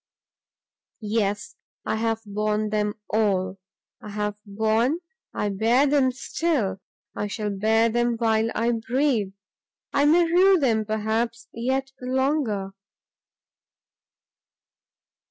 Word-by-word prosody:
"Yes, 205 Hz, -2 st, -1 dB, 0.3 s
I -, -, -1 dB
have 225 Hz, 0 st, -1 dB
borne 210 Hz, +1 st, -1 dB
them 210 Hz, -1 st, 0 dB
all! 195 Hz, -3 st, 0 dB, 0.4 s
have 210 Hz, 0 st, -3 dB
borne? 220 Hz, +7 st, +1 dB, 0.3 s
I 210 Hz, -, -2 dB
bear 225 Hz, +7 st, +3 dB
them 275 Hz, -2 st, +3 dB
still; 250 Hz, -, -1 dB, 0.3 s
I 210 Hz, -, -2 dB
shall 210 Hz, 0 st, -3 dB
bear 220 Hz, +3 st, +2 dB
them 240 Hz, 0 st, +1 dB
while 225 Hz, -1 st, +2 dB
I 230 Hz, +1 st, +1 dB
breathe! 230 Hz, -3 st, 0 dB, 0.6 s
I 285 Hz, -, +3 dB
may 335 Hz, +4 st, +5 dB
rue 370 Hz, +3 st, +5 dB
them, 230 Hz, -8 st, +1 dB
perhaps, 220 Hz, +2 st, -2 dB
yet 265 Hz, +3 st, -1 dB
longer." 255 Hz, -6 st, 0 dB
225 Hz, 100 wpm, -24 LUFS, 210-260 Hz, 0.6 s, may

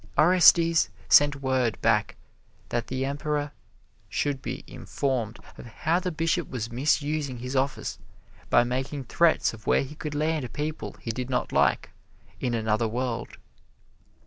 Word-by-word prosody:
Orestes 170 Hz, -1 st, +6 dB, 0.2 s
sent 145 Hz, -1 st, +5 dB
word 130 Hz, -4 st, +1 dB
back -, -, +1 dB, 0.5 s
that 120 Hz, 0 st, -2 dB
the 130 Hz, +1 st, -2 dB
Emperor 145 Hz, +1 st, -2 dB, 0.6 s
should 140 Hz, -2 st, -1 dB
be -, -, -5 dB
informed 120 Hz, -5 st, -3 dB, 0.2 s
of -, -, -8 dB
how 160 Hz, +9 st, 0 dB
this 180 Hz, 0 st, -3 dB
Bishop 165 Hz, +1 st, 0 dB
was 115 Hz, -3 st, -4 dB
misusing 145 Hz, +1 st, 0 dB
his 125 Hz, +3 st, -5 dB
office 135 Hz, +1 st, -1 dB, 0.5 s
by -, -, +5 dB
making 130 Hz, +3 st, -3 dB
threats 165 Hz, +4 st, +2 dB
of 110 Hz, -1 st, -13 dB
where -, -, +3 dB
he 135 Hz, +2 st, -9 dB
could 150 Hz, -1 st, -6 dB
land 155 Hz, -3 st, -1 dB
people 150 Hz, +1 st, -4 dB
he 115 Hz, -, -3 dB
did 125 Hz, +2 st, -5 dB
not 125 Hz, -, -1 dB
like, -, -, +2 dB, 0.5 s
in 120 Hz, -2 st, -1 dB
another 110 Hz, 0 st, 0 dB
world. 120 Hz, 0 st, -3 dB
135 Hz, 145 wpm, -26 LUFS, 120-150 Hz, 0.6 s, Orestes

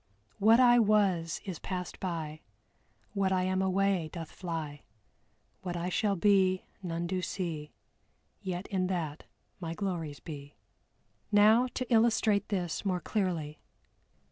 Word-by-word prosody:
"What 225 Hz, +4 st, +6 dB
I 245 Hz, -1 st, +7 dB
was 200 Hz, -7 st, +2 dB
is 185 Hz, -5 st, -5 dB
passed 180 Hz, -1 st, -5 dB
by, 160 Hz, -4 st, -4 dB, 0.7 s
What 195 Hz, -2 st, +1 dB
I 185 Hz, -1 st, +2 dB
am 185 Hz, 0 st, +1 dB
away 190 Hz, -3 st, +1 dB
doth 165 Hz, -3 st, -7 dB
fly; 160 Hz, -5 st, -5 dB, 0.8 s
What 175 Hz, -2 st, -4 dB
I 175 Hz, +1 st, -2 dB
shall 200 Hz, +2 st, +1 dB
be 190 Hz, -1 st, +3 dB, 0.2 s
none 170 Hz, -2 st, -3 dB
do 185 Hz, +1 st, -1 dB
see, 165 Hz, -4 st, -4 dB, 0.7 s
Yet 185 Hz, -1 st, -4 dB
in 185 Hz, -2 st, 0 dB
that 165 Hz, -5 st, -3 dB, 0.3 s
my 165 Hz, -2 st, -4 dB
glories 165 Hz, -8 st, -3 dB
be." 145 Hz, 0 st, -9 dB, 0.8 s
Now 215 Hz, +4 st, +6 dB
to 255 Hz, -, -1 dB
illustrate 220 Hz, -3 st, +3 dB
this 180 Hz, -5 st, -2 dB
more 185 Hz, -3 st, 0 dB
clearly. 170 Hz, -8 st, -2 dB
185 Hz, 130 wpm, -30 LUFS, 165-200 Hz, 0.8 s, I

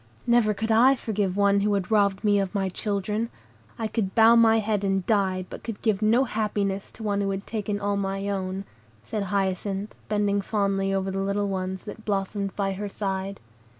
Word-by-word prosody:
"Never 235 Hz, -3 st, +3 dB
could 220 Hz, +3 st, -2 dB
I 250 Hz, +5 st, +6 dB
forgive 205 Hz, -6 st, -2 dB
one 200 Hz, 0 st, +4 dB
who 205 Hz, 0 st, +2 dB
had 195 Hz, +1 st, -2 dB
robbed 200 Hz, -2 st, +2 dB
me 205 Hz, -1 st, +4 dB
of 195 Hz, +1 st, -2 dB
my 195 Hz, -1 st, 0 dB
children. 210 Hz, +3 st, -2 dB, 0.5 s
I 225 Hz, -, -2 dB
could 210 Hz, -4 st, -2 dB
bow 225 Hz, 0 st, +7 dB
my 225 Hz, -1 st, +6 dB
head 210 Hz, -2 st, 0 dB
and 195 Hz, -2 st, 0 dB
die, 190 Hz, -4 st, +1 dB
but -, -, -9 dB
could 225 Hz, -3 st, -5 dB
give 215 Hz, -3 st, +1 dB
no 225 Hz, +5 st, +4 dB
happiness 205 Hz, -4 st, -2 dB
to 225 Hz, -, -10 dB
one 205 Hz, -1 st, 0 dB
who 200 Hz, -, 0 dB
had 195 Hz, 0 st, -3 dB
taken 210 Hz, -2 st, -3 dB
all 205 Hz, 0 st, 0 dB
my 195 Hz, 0 st, -2 dB
own," 190 Hz, -1 st, -2 dB, 0.4 s
said 200 Hz, -, -3 dB
Hyacinth, 195 Hz, +1 st, -1 dB, 0.2 s
bending 205 Hz, -1 st, +1 dB
fondly 195 Hz, -1 st, 0 dB
over 195 Hz, 0 st, -1 dB
the 195 Hz, -, -2 dB
little 200 Hz, +1 st, 0 dB
ones 190 Hz, -1 st, -3 dB
that 220 Hz, +1 st, -8 dB
blossomed 200 Hz, -1 st, -2 dB
by 195 Hz, -1 st, 0 dB
her 205 Hz, +2 st, -4 dB
side. 195 Hz, -1 st, -3 dB
200 Hz, 195 wpm, -26 LUFS, 195-215 Hz, 0.5 s, bow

